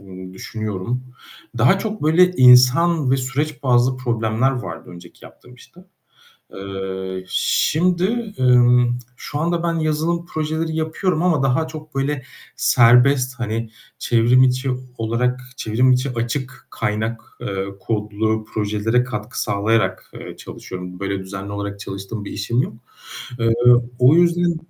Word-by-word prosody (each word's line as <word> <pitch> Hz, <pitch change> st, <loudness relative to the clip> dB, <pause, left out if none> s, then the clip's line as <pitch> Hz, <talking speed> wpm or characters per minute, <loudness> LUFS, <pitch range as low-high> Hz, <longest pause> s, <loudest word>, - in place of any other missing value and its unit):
ımm, 95 Hz, -1 st, -11 dB
düşünüyorum. 110 Hz, +4 st, -4 dB, 0.5 s
Daha 140 Hz, +12 st, +4 dB
çok 215 Hz, -2 st, -5 dB
böyle 175 Hz, +4 st, +4 dB
insan 130 Hz, +3 st, +5 dB
ve 135 Hz, -, +3 dB
süreç 135 Hz, +4 st, -3 dB
bazlı 125 Hz, 0 st, +2 dB
problemler 115 Hz, 0 st, 0 dB
vardı 125 Hz, -7 st, -6 dB
önceki 85 Hz, -1 st, -14 dB
yaptığım 125 Hz, 0 st, -16 dB
işte. 170 Hz, +8 st, -18 dB, 0.7 s
Eee, 95 Hz, -1 st, -5 dB
şimdi, 185 Hz, -, 0 dB
ımm, 125 Hz, -1 st, +4 dB, 0.2 s
şu 145 Hz, -, -6 dB
anda 170 Hz, +1 st, 0 dB
ben 170 Hz, -1 st, 0 dB
yazılım 160 Hz, +2 st, -1 dB
projeleri 160 Hz, +1 st, -3 dB
yapıyorum 160 Hz, +2 st, -1 dB
ama 165 Hz, -6 st, +2 dB
daha 135 Hz, +4 st, +1 dB
çok 155 Hz, -2 st, -10 dB
böyle 135 Hz, 0 st, -1 dB, 0.3 s
serbest, 125 Hz, +2 st, +4 dB
hani, 115 Hz, 0 st, -3 dB, 0.3 s
çevrim 120 Hz, +2 st, +3 dB
içi 130 Hz, +1 st, 0 dB, 0.3 s
olarak, 125 Hz, +3 st, -1 dB, 0.2 s
çevrim 125 Hz, +3 st, +2 dB
içi 130 Hz, +1 st, 0 dB
açık 125 Hz, +3 st, -4 dB
kaynak, 110 Hz, +2 st, -2 dB, 0.2 s
eee, 95 Hz, 0 st, -3 dB
kodlu 110 Hz, +1 st, -2 dB
projelere 110 Hz, +3 st, 0 dB
katkı 105 Hz, -4 st, -5 dB
sağlayarak, 100 Hz, -2 st, 0 dB
eee, -, -, -9 dB
çalışıyorum. 90 Hz, 0 st, -9 dB
Böyle 100 Hz, 0 st, -2 dB
düzenli 95 Hz, +1 st, -7 dB
olarak 100 Hz, 0 st, -5 dB
çalıştığım 100 Hz, +2 st, -6 dB
bir -, -, -7 dB
işim 115 Hz, +4 st, -1 dB
yok. -, -, -5 dB, 0.6 s
Eee, 115 Hz, 0 st, +2 dB, 0.4 s
o 125 Hz, +4 st, +6 dB
yüzden 175 Hz, 0 st, +3 dB
125 Hz, 130 wpm, -20 LUFS, 105-150 Hz, 0.7 s, o